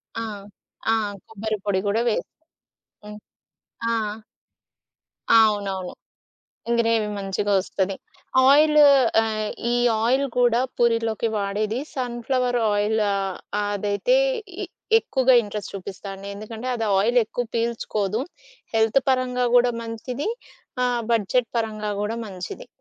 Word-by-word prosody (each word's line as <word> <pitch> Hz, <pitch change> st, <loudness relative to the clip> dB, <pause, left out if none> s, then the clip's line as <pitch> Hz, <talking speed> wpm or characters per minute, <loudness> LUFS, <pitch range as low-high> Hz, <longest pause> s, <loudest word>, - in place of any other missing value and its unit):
ఆ! 230 Hz, -, -3 dB, 0.7 s
ఆ! -, -, +5 dB, 0.4 s
కొబ్బరి 220 Hz, 0 st, -3 dB
పొడి 195 Hz, -2 st, +1 dB
గూడా 220 Hz, +3 st, +1 dB
వేసి. -, -, -2 dB, 0.7 s
హ్మ్. 210 Hz, 0 st, -9 dB, 0.7 s
ఆ! -, -, +1 dB, 1.4 s
అవునవును. 200 Hz, -4 st, +2 dB, 0.9 s
గ్రేవి 225 Hz, -2 st, +2 dB
మంచిగా 200 Hz, +1 st, -1 dB
ఒస్తది. 190 Hz, 0 st, -2 dB, 0.5 s
ఆయిలు 300 Hz, +1 st, +6 dB, 0.4 s
ఆహ్, 215 Hz, -1 st, -2 dB, 0.2 s
ఈ -, -, +2 dB, 0.3 s
ఆయిల్ 260 Hz, +4 st, +2 dB
కూడా 240 Hz, -1 st, +4 dB, 0.2 s
పూరిలోకి 230 Hz, -1 st, +1 dB
వాడేది. 210 Hz, +4 st, -1 dB
సన్‌ఫ్లవర్ 245 Hz, 0 st, -1 dB
ఆయిల్ 210 Hz, +2 st, +1 dB
ఆహ్, 195 Hz, -1 st, -2 dB, 0.3 s
అదైతే 205 Hz, -, +1 dB, 0.5 s
ఇ -, -, -3 dB, 0.3 s
ఎక్కువగా 260 Hz, -, +2 dB
ఇంట్రెస్ట్ 205 Hz, -1 st, -6 dB
చూపిస్తా 195 Hz, +1 st, -7 dB
అండి. 195 Hz, +1 st, -9 dB
ఎందుకంటే, 220 Hz, +4 st, -7 dB
అది 225 Hz, -2 st, -2 dB
ఆయిలెక్కువ 240 Hz, +2 st, +1 dB
పీల్చుకోదు. 225 Hz, -2 st, -1 dB, 0.5 s
హెల్త్ 225 Hz, +4 st, +3 dB
పరంగా 250 Hz, -1 st, +1 dB
గూడా 245 Hz, 0 st, +4 dB
మంచిది. 235 Hz, -, -4 dB, 0.6 s
ఆహ్, 245 Hz, -1 st, 0 dB
బడ్జెట్ 230 Hz, +2 st, +1 dB
పరంగా 215 Hz, -2 st, -2 dB
గూడా 215 Hz, +2 st, -2 dB
మంచిది. 185 Hz, -3 st, -7 dB
225 Hz, 110 wpm, -23 LUFS, 205-245 Hz, 1.4 s, ఆయిలు